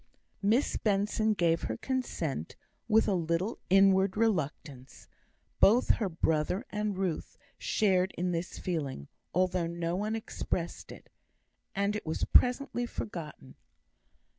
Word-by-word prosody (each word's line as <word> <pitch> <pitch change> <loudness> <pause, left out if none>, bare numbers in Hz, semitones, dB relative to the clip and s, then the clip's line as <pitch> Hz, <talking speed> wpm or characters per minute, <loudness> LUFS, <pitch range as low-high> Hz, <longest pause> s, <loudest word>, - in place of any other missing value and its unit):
Miss 220 +7 +2
Benson 210 +1 +1
gave 165 -3 +2
her 110 - -3
consent 170 - -3 0.3
with 220 +1 +4
a 205 - +2
little 170 +5 -1
inward 195 0 +4
reluctance. 155 - -2 0.5
Both 235 +5 +5
her 205 -4 +2
brother 160 - 0
and 210 -2 -2
Ruth 185 -4 -3 0.2
shared 190 -3 +2
in 180 +1 0
this 170 +1 -3
feeling, 145 - -4 0.2
although 180 -1 +1
no 170 0 -2
one 210 +3 -1
expressed 180 -5 -4
it; - - -13 0.6
and 200 +1 0
it 210 - -3
was 160 - -1
presently 250 -1 +3
forgotten. 150 - -7
185 Hz, 120 wpm, -30 LUFS, 165-210 Hz, 0.6 s, Both